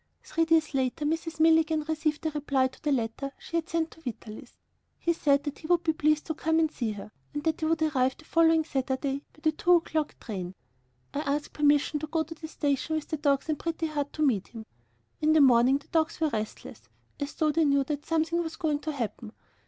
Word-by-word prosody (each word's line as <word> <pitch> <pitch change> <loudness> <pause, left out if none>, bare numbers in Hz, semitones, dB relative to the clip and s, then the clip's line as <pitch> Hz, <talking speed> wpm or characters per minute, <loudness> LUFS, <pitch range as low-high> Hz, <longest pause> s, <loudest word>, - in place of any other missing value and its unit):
Three 330 - 0
days 320 -2 +2
later 265 +2 0
Mrs. 320 +1 -2
Milligan 320 -1 +4
received 310 -1 -1
a 315 - +1
reply 280 -3 +1
to 260 - -19
the 300 - 0
letter 260 +2 -1
she 335 - -4
had 335 0 -3
sent 330 0 -1
Vitalis. 225 -3 -8 0.4
He 340 - +1
said 285 -3 +2
that 290 -1 -5
he 310 - -8
would 350 0 +3
be 320 - +2
pleased 305 -1 +2
to 320 - -2
come 320 +1 0
and 320 -2 +2
see 230 -7 -2
her, 205 +1 -9 0.2
and 295 - -2
that 320 -1 0
he 315 - 0
would 325 0 +1
arrive 265 -4 +1
the 310 - -17
following 325 -1 +4
Saturday, 270 -1 -2
by 305 - -22
the 315 - +4
two 350 +3 +3
o'clock 315 -3 -1
train. 190 -5 -6 0.6
I 285 - -1
asked 290 0 -2
permission 295 0 +3
to 310 - -5
go 320 +1 0
to 325 - -9
the 320 0 -9
station 295 0 -1
with 310 - -4
the 315 - -1
dogs 285 -1 +1
and 310 -2 -1
Pretty 330 0 -2
Heart 290 -2 -2
to 310 - -1
meet 220 -9 +1
him. 225 -2 -10 0.6
In 310 0 +4
the 315 - +5
morning 255 0 +6
the 280 - -16
dogs 320 0 0
were 315 -1 +2
restless 215 -4 -5 0.4
as 285 0 -4
though 310 -1 +2
they 325 +2 +2
knew 280 -1 +3
that 290 +1 -4
something 330 +1 +1
was 325 -1 -5
going 305 -4 0
to 310 +1 -4
happen. 235 -3 -5
300 Hz, 225 wpm, -28 LUFS, 275-320 Hz, 0.6 s, morning